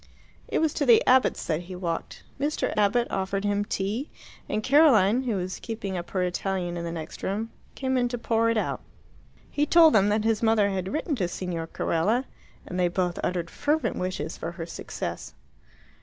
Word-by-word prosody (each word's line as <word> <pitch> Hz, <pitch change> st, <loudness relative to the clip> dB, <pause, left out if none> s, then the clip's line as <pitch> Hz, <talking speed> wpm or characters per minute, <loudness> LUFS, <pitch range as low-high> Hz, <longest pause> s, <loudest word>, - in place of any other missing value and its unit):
It -, -, -1 dB
was 320 Hz, -2 st, +1 dB
to 290 Hz, -, 0 dB
the 235 Hz, -2 st, +7 dB
Abbotts' 255 Hz, 0 st, +3 dB
that 160 Hz, 0 st, -1 dB
he 180 Hz, +1 st, -9 dB
walked. 170 Hz, -2 st, -4 dB, 0.2 s
Mr. 295 Hz, +2 st, -1 dB
Abbott 215 Hz, +3 st, +2 dB
offered 195 Hz, +1 st, -1 dB
him 205 Hz, 0 st, +1 dB
tea, 205 Hz, +7 st, -2 dB, 0.4 s
and 215 Hz, +1 st, -1 dB
Caroline, 255 Hz, -6 st, +5 dB
who 235 Hz, -4 st, 0 dB
was 185 Hz, -1 st, -3 dB
keeping 210 Hz, -4 st, -5 dB
up 175 Hz, -1 st, -5 dB
her 185 Hz, -2 st, 0 dB
Italian 180 Hz, 0 st, -2 dB
in 170 Hz, -, -4 dB
the 170 Hz, -, -3 dB
next 165 Hz, -2 st, -7 dB
room, 215 Hz, +4 st, -2 dB, 0.2 s
came 260 Hz, -1 st, -1 dB
in 245 Hz, -, +2 dB
to 245 Hz, 0 st, -3 dB
pour 230 Hz, 0 st, +1 dB
it 230 Hz, -, +1 dB
out. -, -, -1 dB, 0.7 s
He 295 Hz, +1 st, +1 dB
told 325 Hz, -1 st, +7 dB
them 205 Hz, -1 st, +4 dB
that 210 Hz, +1 st, +1 dB
his 225 Hz, -1 st, +1 dB
mother 220 Hz, -3 st, +3 dB
had 190 Hz, 0 st, -3 dB
written 310 Hz, +1 st, -1 dB
to 185 Hz, -5 st, 0 dB
Signor 175 Hz, -2 st, -4 dB
Carella, 210 Hz, +12 st, 0 dB, 0.4 s
and 180 Hz, -, -4 dB
they 180 Hz, -, +3 dB
both 175 Hz, 0 st, -1 dB
uttered 175 Hz, -2 st, -2 dB
fervent 300 Hz, +2 st, 0 dB
wishes 185 Hz, -2 st, -3 dB
for 165 Hz, +1 st, -5 dB
her 165 Hz, -1 st, -6 dB
success. 170 Hz, -, -6 dB
200 Hz, 190 wpm, -26 LUFS, 180-240 Hz, 0.7 s, the